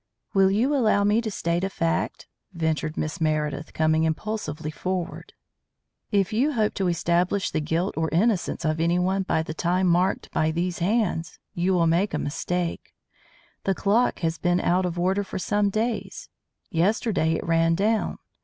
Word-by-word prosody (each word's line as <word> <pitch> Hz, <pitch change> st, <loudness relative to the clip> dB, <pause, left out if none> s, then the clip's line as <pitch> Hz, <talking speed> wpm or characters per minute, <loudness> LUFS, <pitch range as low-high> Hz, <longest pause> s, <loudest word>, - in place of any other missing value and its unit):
"Will 195 Hz, -2 st, +5 dB
you 230 Hz, +9 st, +2 dB
allow 215 Hz, -6 st, +3 dB
me 210 Hz, +3 st, +3 dB
to 225 Hz, -, -3 dB
state 170 Hz, -3 st, -1 dB
a 195 Hz, -, 0 dB
fact," 165 Hz, -3 st, -1 dB, 0.3 s
ventured 160 Hz, -2 st, -1 dB
Miss 155 Hz, +1 st, -3 dB
Meredith, 155 Hz, -1 st, -1 dB
coming 155 Hz, 0 st, +2 dB
impulsively 160 Hz, -2 st, -3 dB
forward. 185 Hz, +2 st, -4 dB, 0.8 s
"If 200 Hz, 0 st, +1 dB
you 275 Hz, +7 st, +2 dB
hope 215 Hz, -4 st, +1 dB
to 190 Hz, -, -1 dB
establish 175 Hz, +3 st, +1 dB
the -, -, 0 dB
guilt 165 Hz, +5 st, -1 dB
or 160 Hz, 0 st, 0 dB
innocence 185 Hz, -1 st, +1 dB
of 155 Hz, 0 st, 0 dB
anyone 180 Hz, +3 st, +1 dB
by 160 Hz, -4 st, 0 dB
the 160 Hz, -, -5 dB
time 180 Hz, +3 st, 0 dB
marked 180 Hz, +2 st, +1 dB
by 155 Hz, -, +1 dB
these 170 Hz, +2 st, -2 dB
hands, 180 Hz, -3 st, 0 dB, 0.2 s
you 180 Hz, +2 st, +1 dB
will 170 Hz, -2 st, +3 dB
make 170 Hz, +5 st, +1 dB
a -, -, 0 dB
mistake. 175 Hz, +3 st, -3 dB, 0.7 s
The 195 Hz, -, +1 dB
clock 215 Hz, +4 st, +1 dB
has 160 Hz, -1 st, -1 dB
been 175 Hz, 0 st, +2 dB
out 180 Hz, +1 st, +2 dB
of 175 Hz, 0 st, -5 dB
order 190 Hz, +3 st, +1 dB
for -, -, -6 dB
some 205 Hz, +2 st, +1 dB
days. 220 Hz, +3 st, -3 dB, 0.4 s
Yesterday 185 Hz, -1 st, +1 dB
it -, -, -3 dB
ran 165 Hz, 0 st, +3 dB
down. 215 Hz, +4 st, 0 dB
180 Hz, 165 wpm, -25 LUFS, 165-200 Hz, 0.8 s, Will